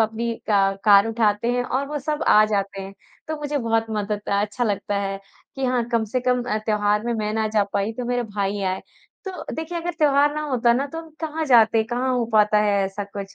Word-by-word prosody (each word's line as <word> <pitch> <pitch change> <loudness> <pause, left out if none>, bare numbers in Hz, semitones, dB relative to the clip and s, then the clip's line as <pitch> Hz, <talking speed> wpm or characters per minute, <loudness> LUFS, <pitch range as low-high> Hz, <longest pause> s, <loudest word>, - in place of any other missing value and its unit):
अपनी 225 +1 0
अ, - - -13 0.5
कार 205 0 +7
उठाते 220 -1 +1
हैं 245 0 0
और 265 +3 -2
वो 295 0 -3
सब 300 +2 -3
आ 215 - +7
जाते 200 -2 -2
हैं। 195 +1 -9 0.3
तो 315 - -2
मुझे 290 0 -2
बहुत 225 -2 0
मदद 210 -1 -3
अच्छा 210 +4 0
लगता 205 -1 -2
है 195 0 -3 0.4
कि 270 - -2
हाँ 250 -2 +1
कम 230 -1 +2
से 235 +4 -2
कम 250 0 +1
अ, 230 -3 -1
त्योहार 210 -1 +1
में 240 - -1
मैं 215 -1 -2
ना 220 -1 0
जा 215 -1 +2
पाई, 200 +3 -1
तो 245 +2 -5
मेरे 245 0 0
भाई 205 -2 -3
आए। 190 0 -1 0.4
तो 385 - -4 0.2
देखिए 325 +2 -4
अगर 345 +1 -3
त्योहार 290 0 +3
ना 305 - -2
होता 240 -2 +3
ना 265 +4 0
तो 325 - -4
वो 325 - -15
कहाँ 320 0 -3
जाते 230 -4 +5
हैं, 220 - +1
कहाँ 250 +2 -1
हो 240 - +1
पाता 210 -1 +4
है 200 -1 +2
ऐसा 195 +1 -4
कुछ। 200 -1 -8
225 Hz, 235 wpm, -23 LUFS, 205-255 Hz, 0.5 s, कार